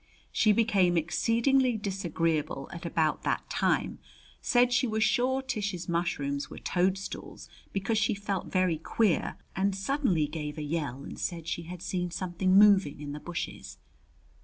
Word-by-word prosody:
She 215 Hz, -, +4 dB
became 200 Hz, -5 st, +3 dB
exceedingly 235 Hz, -, +2 dB
disagreeable 165 Hz, -8 st, -1 dB
at 170 Hz, 0 st, -6 dB
about 160 Hz, -2 st, +1 dB
that -, -, -1 dB
time, -, -, 0 dB, 0.4 s
said 245 Hz, 0 st, +3 dB
she 255 Hz, -, +3 dB
was 220 Hz, 0 st, +1 dB
sure 260 Hz, +4 st, +2 dB
Tish's 205 Hz, -8 st, -3 dB
mushrooms 145 Hz, -5 st, -1 dB
were -, -, -9 dB
toadstools 190 Hz, +2 st, -2 dB, 0.2 s
because 200 Hz, +3 st, 0 dB
she 220 Hz, 0 st, +1 dB
felt 200 Hz, -2 st, -3 dB
very 185 Hz, -4 st, +1 dB
queer, 200 Hz, +2 st, +1 dB, 0.2 s
and 195 Hz, +1 st, +1 dB
suddenly 195 Hz, -, +1 dB
gave 150 Hz, 0 st, -5 dB
a 155 Hz, -, -3 dB
yell 145 Hz, -4 st, -3 dB
and -, -, -8 dB
said 170 Hz, -3 st, -3 dB
she 170 Hz, 0 st, -3 dB
had 180 Hz, -1 st, -7 dB
seen 180 Hz, -1 st, -2 dB
something 185 Hz, +1 st, +1 dB
moving 200 Hz, -8 st, +5 dB
in 145 Hz, -1 st, -6 dB
the 150 Hz, -, -5 dB
bushes. 150 Hz, -, -6 dB
185 Hz, 150 wpm, -29 LUFS, 165-210 Hz, 0.4 s, moving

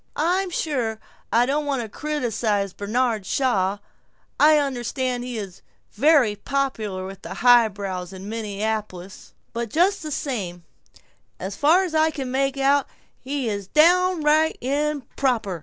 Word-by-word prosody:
I'm 360 Hz, +5 st, +1 dB
sure 250 Hz, -10 st, -2 dB, 0.3 s
I 235 Hz, +2 st, +4 dB
don't 290 Hz, +3 st, -1 dB
want 270 Hz, -4 st, -1 dB
to -, -, -6 dB
criticize 220 Hz, -7 st, -2 dB
Bernard 220 Hz, +1 st, -1 dB
Shaw; 200 Hz, -5 st, 0 dB, 0.6 s
I 305 Hz, +1 st, +6 dB
understand 255 Hz, -2 st, -2 dB
he 245 Hz, -2 st, -5 dB
is 195 Hz, -4 st, -7 dB, 0.3 s
very 265 Hz, -3 st, +4 dB
popular 220 Hz, -7 st, -2 dB
with 195 Hz, 0 st, -9 dB
the -, -, -7 dB
highbrows 200 Hz, -7 st, +2 dB
in 190 Hz, +1 st, -9 dB
Minneapolis; 210 Hz, -3 st, -4 dB, 0.2 s
but 235 Hz, -1 st, -3 dB
just 365 Hz, -, +2 dB
the 310 Hz, -, -5 dB
same 200 Hz, -, -4 dB, 0.8 s
As 190 Hz, +2 st, -5 dB
far 325 Hz, +6 st, +4 dB
as 360 Hz, -4 st, -4 dB
I 315 Hz, 0 st, +3 dB
can 270 Hz, -5 st, -5 dB
make 270 Hz, +1 st, 0 dB
out, 275 Hz, 0 st, +3 dB, 0.3 s
he's 240 Hz, -8 st, -3 dB
downright 320 Hz, -, +3 dB
improper! 265 Hz, -, -1 dB
250 Hz, 130 wpm, -23 LUFS, 205-295 Hz, 0.8 s, I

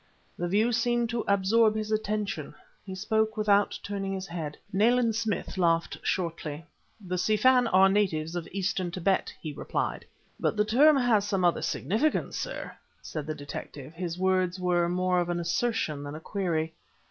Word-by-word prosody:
The 175 Hz, -, -2 dB
view 215 Hz, +6 st, +2 dB
seemed 240 Hz, 0 st, +1 dB
to 235 Hz, -1 st, -1 dB
absorb 215 Hz, +3 st, +3 dB
his 215 Hz, 0 st, -3 dB
attention. 210 Hz, -7 st, -2 dB, 0.3 s
He 190 Hz, -2 st, -7 dB
spoke 220 Hz, +2 st, 0 dB
without 205 Hz, -1 st, +3 dB
turning 195 Hz, -1 st, -3 dB
his 190 Hz, -1 st, -4 dB
head. 160 Hz, -4 st, -5 dB, 0.2 s
Nayland 230 Hz, +3 st, +3 dB
Smith 220 Hz, -3 st, -2 dB
laughed 165 Hz, -1 st, +1 dB
shortly. 165 Hz, -3 st, -3 dB, 0.3 s
"The 180 Hz, -3 st, -3 dB
Si 215 Hz, +4 st, +2 dB
Fan 250 Hz, +2 st, +5 dB
are 190 Hz, -2 st, +6 dB
the 195 Hz, -, +1 dB
natives 165 Hz, -5 st, 0 dB
of 175 Hz, -2 st, -4 dB
Eastern 190 Hz, -1 st, -1 dB
Tibet," 185 Hz, +2 st, 0 dB
he 155 Hz, -2 st, -6 dB
replied. -, -, -3 dB, 0.3 s
"But -, -, 0 dB
the 210 Hz, -, +3 dB
term 280 Hz, +7 st, +5 dB
has 225 Hz, -6 st, +2 dB
some 195 Hz, -3 st, +1 dB
other 175 Hz, -, +2 dB
significance, 220 Hz, -, 0 dB
sir?" -, -, -5 dB, 0.3 s
said 155 Hz, -2 st, -5 dB
the 155 Hz, -, -3 dB
detective; 145 Hz, 0 st, -8 dB
his 170 Hz, 0 st, -4 dB
words 185 Hz, 0 st, +1 dB
were 175 Hz, -1 st, +1 dB
more 180 Hz, 0 st, +1 dB
of 175 Hz, 0 st, -1 dB
an 175 Hz, 0 st, -1 dB
assertion 170 Hz, -5 st, -1 dB
than 145 Hz, +1 st, -6 dB
a -, -, -6 dB
query. 160 Hz, -3 st, -2 dB
190 Hz, 170 wpm, -28 LUFS, 170-215 Hz, 0.3 s, are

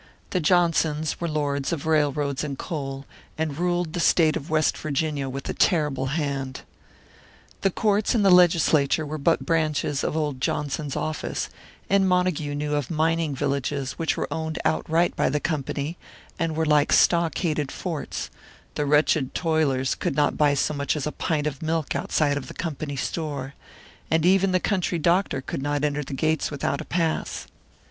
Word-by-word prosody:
The 185 Hz, -, +1 dB
Johnsons 160 Hz, -3 st, +2 dB
were 170 Hz, -, 0 dB
lords 145 Hz, -2 st, -1 dB
of 160 Hz, -4 st, -3 dB
railroads 145 Hz, -3 st, +1 dB
and 140 Hz, -3 st, -4 dB
coal, 135 Hz, -4 st, -5 dB, 0.3 s
and 155 Hz, -1 st, -2 dB
ruled 175 Hz, -2 st, 0 dB
the 175 Hz, -, -2 dB
state 160 Hz, -2 st, +4 dB
of 150 Hz, -, -5 dB
West 155 Hz, -1 st, +2 dB
Virginia 150 Hz, -2 st, -2 dB
with 135 Hz, +1 st, -6 dB
a -, -, -2 dB
terrible 150 Hz, -7 st, +1 dB
hand. 135 Hz, -3 st, -2 dB, 1.0 s
The 195 Hz, -, +3 dB
courts 210 Hz, +4 st, +1 dB
and 210 Hz, -3 st, +3 dB
the 195 Hz, -, +6 dB
legislature 165 Hz, -4 st, +4 dB
were 155 Hz, +1 st, -5 dB
but 165 Hz, +4 st, +2 dB
branches 155 Hz, -3 st, 0 dB
of 155 Hz, -, -1 dB
old 145 Hz, -4 st, -2 dB
Johnson's 145 Hz, 0 st, -2 dB
office, 155 Hz, 0 st, -3 dB, 0.4 s
and 195 Hz, -1 st, +3 dB
Montague 180 Hz, -5 st, +1 dB
knew 150 Hz, 0 st, -2 dB
of 145 Hz, -3 st, -1 dB
mining 160 Hz, -2 st, +1 dB
villages 140 Hz, 0 st, -1 dB
which 165 Hz, -, -1 dB
were -, -, -1 dB
owned 160 Hz, 0 st, -3 dB
outright 165 Hz, +2 st, +1 dB
by -, -, +2 dB
the 150 Hz, +2 st, 0 dB
Company, 150 Hz, +1 st, -3 dB, 0.4 s
and 165 Hz, -1 st, -1 dB
were 160 Hz, 0 st, +1 dB
like 150 Hz, -1 st, +3 dB
stockaded 165 Hz, -4 st, +2 dB
forts; 160 Hz, -7 st, -4 dB, 0.4 s
the 145 Hz, -, -1 dB
wretched 150 Hz, -2 st, +2 dB
toilers 145 Hz, -6 st, +1 dB
could -, -, -2 dB
not 145 Hz, 0 st, +2 dB
buy 145 Hz, -1 st, +3 dB
so 140 Hz, -, 0 dB
much 140 Hz, +1 st, -1 dB
as 150 Hz, -, -2 dB
a 150 Hz, -, -2 dB
pint 150 Hz, -2 st, -1 dB
of 145 Hz, -3 st, -3 dB
milk 160 Hz, -2 st, -1 dB
outside 145 Hz, +1 st, +1 dB
of 130 Hz, -3 st, -5 dB
the -, -, -10 dB
Company 155 Hz, -3 st, -4 dB
store, 140 Hz, -1 st, -3 dB, 0.6 s
and 160 Hz, 0 st, +2 dB
even 190 Hz, +1 st, +4 dB
the 185 Hz, -, +3 dB
country 180 Hz, -3 st, 0 dB
doctor 170 Hz, -3 st, +1 dB
could 130 Hz, -, -5 dB
not 145 Hz, +1 st, -1 dB
enter 150 Hz, 0 st, 0 dB
the 135 Hz, -, -6 dB
gates 155 Hz, +2 st, 0 dB
without 140 Hz, -1 st, -2 dB
a -, -, -8 dB
pass. 165 Hz, -1 st, -1 dB
155 Hz, 170 wpm, -25 LUFS, 145-165 Hz, 1.0 s, the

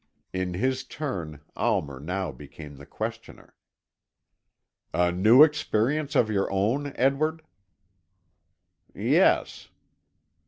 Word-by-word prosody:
In 95 Hz, -1 st, -3 dB
his 130 Hz, +6 st, -1 dB
turn 85 Hz, -, -6 dB
Almer 70 Hz, -3 st, -1 dB
now 90 Hz, +3 st, -3 dB
became 75 Hz, +2 st, -12 dB
the 70 Hz, -, -13 dB
questioner. -, -, -7 dB, 1.4 s
"A 90 Hz, 0 st, +2 dB
new 110 Hz, +10 st, +6 dB
experience 150 Hz, -1 st, 0 dB
of 115 Hz, -, +4 dB
your 100 Hz, -2 st, 0 dB
own, 115 Hz, +9 st, 0 dB
Edward?" 155 Hz, +5 st, 0 dB, 1.5 s
"Yes." -, -, +1 dB
105 Hz, 90 wpm, -26 LUFS, 90-135 Hz, 1.5 s, new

